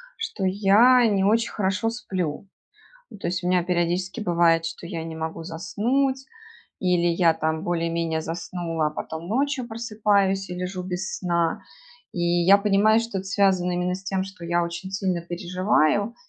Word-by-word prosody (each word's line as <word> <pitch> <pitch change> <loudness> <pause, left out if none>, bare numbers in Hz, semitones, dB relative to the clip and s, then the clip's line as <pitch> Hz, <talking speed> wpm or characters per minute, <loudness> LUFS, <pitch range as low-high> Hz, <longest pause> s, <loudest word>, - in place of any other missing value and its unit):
что 450 - -4
я 210 +6 +5
не 195 -3 +1
очень 230 +3 +2
хорошо 195 +2 0
сплю. 190 -8 -4 0.7
То - - -3
есть 175 +1 -2
у 175 - -1
меня 180 -1 +2
периодически 180 +4 -1
бывает, 170 -3 +2
что 165 +1 -7
я 170 -2 -5
не 160 0 -7
могу 160 +1 -5
заснуть. 260 +11 -1 0.5
Или 180 -2 +1
я 170 -1 +3
там 160 0 -2
более 170 -1 -1
менее 165 -1 -1
заснула, 165 -1 -3
а - - -9
потом 160 +2 -6
ночью 265 +3 0
просыпаюсь 210 -4 0
и - - -4
лежу 180 +1 -4
без 185 +2 -4
сна. 170 -2 0 0.5
И 175 - -4
я 175 +3 +4
понимаю, 210 +2 +3
что 230 -3 -5
это 190 - -7
связано 190 -2 +2
именно 180 +1 -1
с 190 - -9
тем, 190 -1 -1
что 185 -3 -11
я 175 +1 +1
очень 170 +2 -5
сильно 190 -3 -1
переживаю 185 +3 0
185 Hz, 165 wpm, -24 LUFS, 170-200 Hz, 0.7 s, я